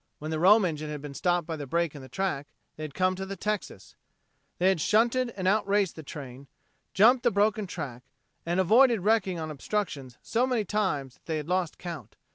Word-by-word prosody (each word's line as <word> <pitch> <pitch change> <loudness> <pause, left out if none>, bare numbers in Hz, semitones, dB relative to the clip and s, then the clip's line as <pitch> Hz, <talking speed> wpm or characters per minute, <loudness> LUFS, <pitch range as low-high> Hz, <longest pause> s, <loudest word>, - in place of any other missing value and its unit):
When 155 +1 -6
the 160 - -1
Rome 200 +4 +6
engine 155 -3 -3
had 150 -1 -5
been 145 -1 -7
stopped 175 +2 0
by 165 - -4
the 145 -2 -6
break 170 +2 0
in 145 - -9
the 130 - -12
track, 175 -3 -2 0.3
they 155 - -7
had 150 -3 -7
come 185 0 +2
to 190 - -5
the 195 +1 -5
Texas. 210 +1 -4 0.6
They 185 +2 +3
had 190 -5 +1
shunted 235 +6 +2
and 185 -1 -1
outraced 200 -2 +2
the 160 - -8
train, 140 -2 -9 0.5
jumped 240 +6 +6
the - - +3
broken 210 +1 +1
track, 140 -9 -6 0.4
and 175 +2 -1
avoided 225 +4 +5
wrecking 195 -3 +2
on 155 -1 -4
obstructions 145 -5 -4
so 240 +3 +1
many 240 -5 0
times 170 -11 -1
that - - -40
they 160 -1 -1
had 150 0 -5
lost 180 -2 -1
count. 160 - -8
180 Hz, 210 wpm, -28 LUFS, 150-210 Hz, 0.6 s, Rome